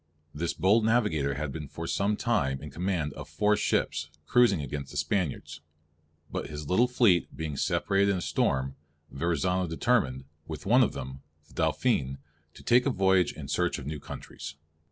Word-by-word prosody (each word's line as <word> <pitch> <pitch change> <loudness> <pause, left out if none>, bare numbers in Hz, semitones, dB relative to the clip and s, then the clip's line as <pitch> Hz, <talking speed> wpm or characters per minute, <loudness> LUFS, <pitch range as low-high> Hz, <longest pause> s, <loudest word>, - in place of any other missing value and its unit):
This 85 +3 -2
bold 105 +4 +4
navigator 105 - +2
had 70 0 -3
been 75 0 -6
for 85 +4 -7
some 100 +5 0
time 95 - 0
in 75 - -7
command 85 -3 -1
of 75 - -9
four 105 +8 +2
ships, 80 -6 0 0.2
cruising 120 -2 +4
against 70 -1 -5
the 75 - -7
Spaniards. 75 0 -2 0.7
But - - -3
his 75 -1 -6
little 115 +10 +4
fleet 115 -8 +2
being 80 -2 -3
separated 100 +7 +1
in 100 - +2
a - - -3
storm, 65 -4 0 0.4
Verrazzano 85 +4 0
determined, 80 - +1 0.2
with 80 -2 -7
one 120 +6 +5
of 125 - +2
them, 65 0 -7 0.3
the - - -20
Dauphin, 65 +1 +1 0.4
to - - -13
take 125 +3 +4
a - - +4
voyage 95 - +3
in - - -8
search - - 0
of 65 - -8
new 75 +1 -4
countries. 75 - -8
80 Hz, 175 wpm, -28 LUFS, 70-100 Hz, 0.7 s, one